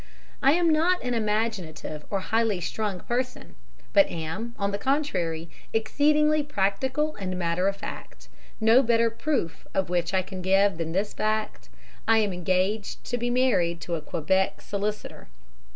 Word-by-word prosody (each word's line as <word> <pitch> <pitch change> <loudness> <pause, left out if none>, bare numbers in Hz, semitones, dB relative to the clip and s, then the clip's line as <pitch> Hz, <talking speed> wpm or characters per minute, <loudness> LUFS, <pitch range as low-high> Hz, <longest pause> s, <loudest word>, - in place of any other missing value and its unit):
I 275 +2 +5
am 345 +1 +2
not 340 +4 +2
an 250 -1 -1
imaginative 210 -9 -2
or 195 -2 -1
highly 220 -1 +1
strung 200 0 -3
person, 250 +1 -3 0.4
but 200 - +6
am, 170 +9 -5
on 200 -1 0
the 200 - -3
contrary, 190 - -1 0.3
exceedingly 300 +6 +3
practical 265 +4 0
and 185 -2 -3
matter 175 +1 0
of 195 - 0
fact, 200 - -9 0.3
no 225 +3 +6
better 230 -2 +3
proof 225 - -2
of 190 -2 0
which 175 0 0
I 185 - +2
can 190 0 -7
give 195 -1 +3
than 165 0 -2
this 200 +3 -1
fact 215 - -2 0.4
I 225 0 +5
am 210 -3 +2
engaged 185 +4 -1
to 245 - -2
be 240 +1 -1
married 200 -10 +2
to 170 - -4
a 165 - -1
Quebec 185 +5 0
solicitor!" 210 +1 -4
205 Hz, 155 wpm, -26 LUFS, 180-240 Hz, 0.4 s, but